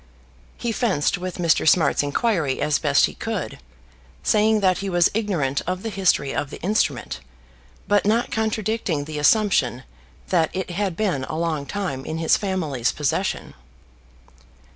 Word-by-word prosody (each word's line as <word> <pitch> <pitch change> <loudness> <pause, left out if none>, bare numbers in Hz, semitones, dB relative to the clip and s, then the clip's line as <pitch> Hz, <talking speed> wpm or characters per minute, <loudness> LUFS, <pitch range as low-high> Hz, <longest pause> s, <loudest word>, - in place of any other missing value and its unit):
He 235 - -2
fenced 195 - 0
with 185 -1 -5
Mr. 170 -2 +3
Smart's 175 - +3
inquiry 145 - 0
as 150 - +1
best - - +4
he - - -5
could, - - -4 0.6
saying 215 0 +3
that 185 -2 +2
he 195 - -3
was 175 -2 +3
ignorant 175 -11 0
of 185 +1 -2
the 225 - -3
history 180 -8 +1
of 145 -1 -2
the - - -9
instrument, 175 - 0 0.7
but 205 0 +3
not 225 +4 +1
contradicting 220 -8 -1
the 150 0 -5
assumption 150 - +2 0.5
that 165 -4 +2
it 185 -1 -3
had 185 -1 -2
been 185 -11 0
a 155 +1 -5
long 160 -4 -2
time 185 -10 -3
in 160 - -4
his 160 -1 +3
family's 160 - -1
possession. 150 -3 -2
180 Hz, 150 wpm, -23 LUFS, 150-205 Hz, 0.7 s, best